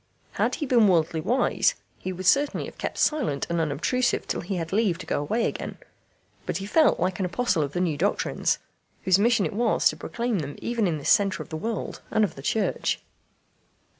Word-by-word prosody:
Had -, -, 0 dB
he 305 Hz, -, -3 dB
been 240 Hz, -5 st, +4 dB
worldly 165 Hz, -3 st, +2 dB
wise, 250 Hz, +11 st, +2 dB, 0.2 s
he 185 Hz, -, -4 dB
would 185 Hz, +1 st, -6 dB
certainly 280 Hz, +10 st, +3 dB
have -, -, -11 dB
kept -, -, -4 dB
silent 250 Hz, -, +1 dB
and 170 Hz, -1 st, +1 dB
unobtrusive 160 Hz, -, 0 dB
till -, -, -2 dB
he 190 Hz, +2 st, -4 dB
had 165 Hz, 0 st, -4 dB
leave 200 Hz, -5 st, +2 dB
to 185 Hz, -, -8 dB
go -, -, -1 dB
away 225 Hz, +11 st, 0 dB
again. -, -, -4 dB, 0.7 s
But -, -, -1 dB
he 195 Hz, -, -5 dB
felt 310 Hz, +8 st, +3 dB
like 185 Hz, +2 st, -1 dB
an 190 Hz, -, 0 dB
apostle 185 Hz, -3 st, 0 dB
of 145 Hz, -1 st, -2 dB
the 180 Hz, -, -1 dB
new 165 Hz, -5 st, 0 dB
doctrines, -, -, 0 dB, 0.5 s
whose 185 Hz, 0 st, +4 dB
mission 220 Hz, -2 st, +3 dB
it 155 Hz, -, -3 dB
was 225 Hz, +2 st, +2 dB
to -, -, -4 dB
proclaim 235 Hz, -3 st, -2 dB
them 145 Hz, -2 st, -5 dB
even 230 Hz, -3 st, 0 dB
in 165 Hz, -3 st, -1 dB
this 145 Hz, -, 0 dB
centre 195 Hz, -6 st, +3 dB
of -, -, -19 dB
the -, -, -5 dB
world 220 Hz, +7 st, -4 dB
and 220 Hz, -, +2 dB
of 205 Hz, -, 0 dB
the 135 Hz, -, -10 dB
Church. 215 Hz, +10 st, 0 dB
190 Hz, 210 wpm, -25 LUFS, 165-230 Hz, 0.7 s, been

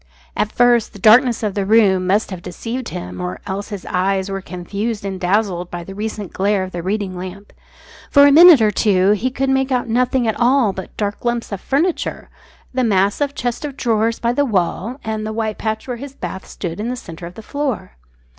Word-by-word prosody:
At 215 Hz, -, 0 dB
first 240 Hz, -2 st, +3 dB
the -, -, -10 dB
darkness 235 Hz, +4 st, +5 dB
of 210 Hz, -2 st, -1 dB
the 200 Hz, -, -1 dB
room 195 Hz, -3 st, +3 dB
must 205 Hz, +3 st, +1 dB
have 185 Hz, -2 st, -6 dB
deceived 230 Hz, +8 st, -5 dB
him, 90 Hz, 0 st, -6 dB
or 90 Hz, +1 st, -4 dB
else 200 Hz, +2 st, -4 dB
his 205 Hz, -3 st, -7 dB
eyes 190 Hz, +1 st, 0 dB
were 195 Hz, 0 st, -3 dB
confused 200 Hz, +5 st, -4 dB
and 190 Hz, -1 st, -4 dB
dazzled 180 Hz, -1 st, 0 dB
by 175 Hz, -1 st, -6 dB
the 195 Hz, -, -9 dB
recent 210 Hz, -1 st, -5 dB
glare 200 Hz, 0 st, +1 dB
of 185 Hz, -, -6 dB
the 175 Hz, -, -4 dB
reading 195 Hz, +1 st, -2 dB
lamp. 185 Hz, +3 st, -8 dB, 0.6 s
For 285 Hz, -1 st, +7 dB
a 285 Hz, -, +6 dB
minute 325 Hz, -2 st, +9 dB
or 210 Hz, -, +3 dB
two 195 Hz, -2 st, +3 dB
he 210 Hz, +5 st, +1 dB
could 270 Hz, +1 st, -1 dB
make 265 Hz, 0 st, +1 dB
out 250 Hz, -1 st, 0 dB
nothing 245 Hz, +1 st, +1 dB
at 220 Hz, -, -1 dB
all 245 Hz, -4 st, +3 dB
but 190 Hz, 0 st, -9 dB
dark 205 Hz, -1 st, -3 dB
lumps 240 Hz, -1 st, -2 dB
of 200 Hz, -, -4 dB
furniture, 320 Hz, +6 st, -1 dB, 0.4 s
the 255 Hz, 0 st, +1 dB
mass 200 Hz, +1 st, +2 dB
of 290 Hz, -, +2 dB
the 280 Hz, -, -24 dB
chest 245 Hz, +2 st, -3 dB
of 285 Hz, -3 st, -5 dB
drawers 225 Hz, -1 st, +1 dB
by 235 Hz, 0 st, 0 dB
the 285 Hz, -, +2 dB
wall, 215 Hz, +2 st, -1 dB
and 220 Hz, -1 st, -3 dB
the 215 Hz, -, -3 dB
white 220 Hz, -1 st, -3 dB
patch 220 Hz, +2 st, -3 dB
where 250 Hz, -2 st, -3 dB
his 275 Hz, +2 st, -9 dB
bath 190 Hz, -7 st, -6 dB
stood 175 Hz, 0 st, -6 dB
in 225 Hz, +3 st, -2 dB
the 250 Hz, -, -2 dB
centre 170 Hz, -7 st, -9 dB
of 175 Hz, -, -12 dB
the 225 Hz, -, -10 dB
floor. 285 Hz, -, -3 dB
215 Hz, 220 wpm, -19 LUFS, 190-245 Hz, 0.6 s, minute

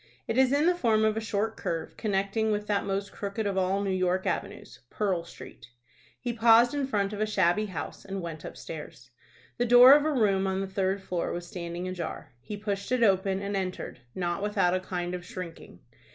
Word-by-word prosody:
It 225 Hz, -, -1 dB
is 260 Hz, 0 st, +4 dB
in 290 Hz, +2 st, +3 dB
the 355 Hz, -, +5 dB
form 225 Hz, -10 st, +2 dB
of 215 Hz, 0 st, +2 dB
a -, -, 0 dB
short 220 Hz, 0 st, -1 dB
curve, 165 Hz, -3 st, -4 dB
connecting 205 Hz, +1 st, 0 dB
with 210 Hz, 0 st, -1 dB
that 205 Hz, -1 st, 0 dB
most 195 Hz, +1 st, -2 dB
crooked 205 Hz, +2 st, -4 dB
of 200 Hz, -1 st, -1 dB
all 190 Hz, +1 st, +1 dB
New 195 Hz, -, -1 dB
York 185 Hz, 0 st, 0 dB
avenues, -, -, -4 dB
Pearl 190 Hz, -5 st, -1 dB
Street. 120 Hz, -7 st, -12 dB, 0.5 s
He 240 Hz, -1 st, -3 dB
paused 235 Hz, +2 st, +5 dB
in 285 Hz, -2 st, -1 dB
front 205 Hz, -5 st, 0 dB
of 210 Hz, -, -4 dB
a 215 Hz, -, +1 dB
shabby 205 Hz, 0 st, +2 dB
house, 185 Hz, -, -6 dB
and 195 Hz, 0 st, -5 dB
went 165 Hz, -3 st, -6 dB
upstairs. 145 Hz, -6 st, -9 dB, 0.5 s
The 245 Hz, -, +2 dB
door 245 Hz, +3 st, +9 dB
of 290 Hz, 0 st, +5 dB
a 310 Hz, -, +1 dB
room 200 Hz, -7 st, +2 dB
on 190 Hz, 0 st, -1 dB
the 195 Hz, -, -1 dB
third 190 Hz, 0 st, -1 dB
floor 180 Hz, -2 st, -2 dB
was 175 Hz, 0 st, -4 dB
standing 175 Hz, 0 st, -5 dB
ajar. 185 Hz, -2 st, -5 dB
He 205 Hz, +12 st, -6 dB
pushed 200 Hz, 0 st, -4 dB
it 250 Hz, -2 st, +2 dB
open, 195 Hz, -1 st, +2 dB
and 200 Hz, 0 st, -2 dB
entered, 185 Hz, -8 st, -4 dB, 0.2 s
not 175 Hz, +1 st, -2 dB
without 200 Hz, -4 st, +1 dB
a 185 Hz, -, +1 dB
kind 180 Hz, -1 st, -4 dB
of 180 Hz, -1 st, -5 dB
shrinking. 180 Hz, -2 st, -9 dB
195 Hz, 210 wpm, -28 LUFS, 185-220 Hz, 0.5 s, door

